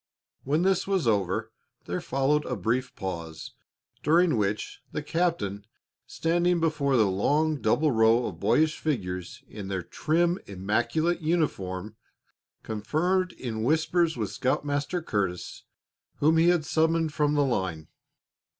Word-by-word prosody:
When 150 +5 +1
this 190 -1 +2
was 190 -9 +1
over, 100 -4 0 0.3
there - - -3
followed 135 +3 +1
a 125 - -2
brief 120 +6 -1
pause, 85 -4 -6 0.5
during 165 +1 +4
which 105 -1 -2
the 150 - -4
captain, 150 - -1 0.4
standing 175 +1 +1
before 150 -5 +1
the 110 - +5
long, 145 +11 +1
double 155 -1 +2
row 115 +1 +4
of 85 -4 -6
boyish 150 - +2
figures, 90 - -3
in 105 -2 -8
their 95 -2 -3
trim, 170 - 0
immaculate 120 - 0
uniforms, 110 - -1 0.7
conferred 170 - 0
in 115 -4 -5
whispers 160 +3 +2
with 105 -4 -2
Scoutmaster 145 +5 -1
Curtis, 95 - -3 0.5
whom 155 +3 +3
he 165 +2 +5
had 175 -4 +2
summoned 160 0 +1
from 150 0 +1
the 145 -1 +3
line. 95 - -2
140 Hz, 130 wpm, -27 LUFS, 105-160 Hz, 0.7 s, the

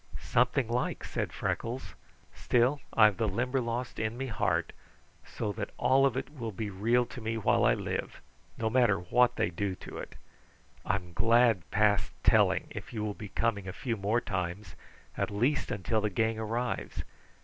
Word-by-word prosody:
"Something 125 +1 +1
like," 120 +2 -1
said - - -3
Freckles. 120 +3 -3 0.4
"Still, 125 +4 +2
I've 105 -4 +5
the 110 - +1
Limberlost 120 +3 -2
in 110 +1 -2
me 135 - -2
heart 110 -6 0 0.5
so 105 -3 -4
that 105 0 -4
all 135 +1 +4
of 130 -2 -2
it 135 - -4
will 120 -7 -5
be 105 +1 -4
real 115 +6 +2
to 125 - -9
me 115 +1 -2
while 110 - +2
I - - +5
live, - - -4 0.4
no 110 - -1
matter 115 -3 +4
what 125 +8 +3
they - - 0
do 95 +2 -2
to - - -9
it. - - -8 0.7
I'm 90 -3 -2
glad 115 -3 +3
past 105 -1 +2
telling - - +4
if - - -7
you 110 -3 -3
will 105 -1 -2
be 105 -1 -9
coming 100 -4 -1
a 95 - -4
few 120 +1 -2
more 105 +3 0
times, 90 0 -4 0.4
at - - -1
least 125 +8 0
until 105 +3 0
the 105 - 0
gang 110 +3 0
arrives. 115 +3 -3
110 Hz, 170 wpm, -30 LUFS, 100-120 Hz, 0.7 s, I've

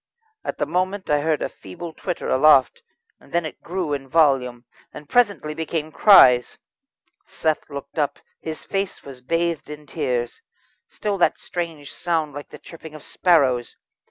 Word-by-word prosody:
At - - -4
the - - 0
moment 185 +3 -2
I 145 - +4
heard 155 0 0
a - - 0
feeble 160 - -10
twitter 180 +1 -4
aloft, 140 - +4 0.4
then 170 -1 -2
it 155 - -8
grew 175 -4 -3
in 135 -1 -4
volume, 130 -5 +2 0.3
and 150 0 -11
presently 200 -10 +2
became 160 0 -3
cries. 130 - +6 0.7
Seth 155 -1 -2
looked 140 +2 -7
up; 145 -2 0 0.2
his 160 -1 -6
face 195 -1 -3
was 135 -2 -11
bathed 165 +3 -1
in 150 0 -9
tears. 120 -3 -3 0.5
Still 205 -2 -3
that - - +3
strange 165 -5 -6
sound 160 -4 -1
like 145 +1 -8
the - - -11
chirping 160 -2 -12
of 155 - -11
sparrows. 135 -9 +2
155 Hz, 155 wpm, -22 LUFS, 140-170 Hz, 0.7 s, cries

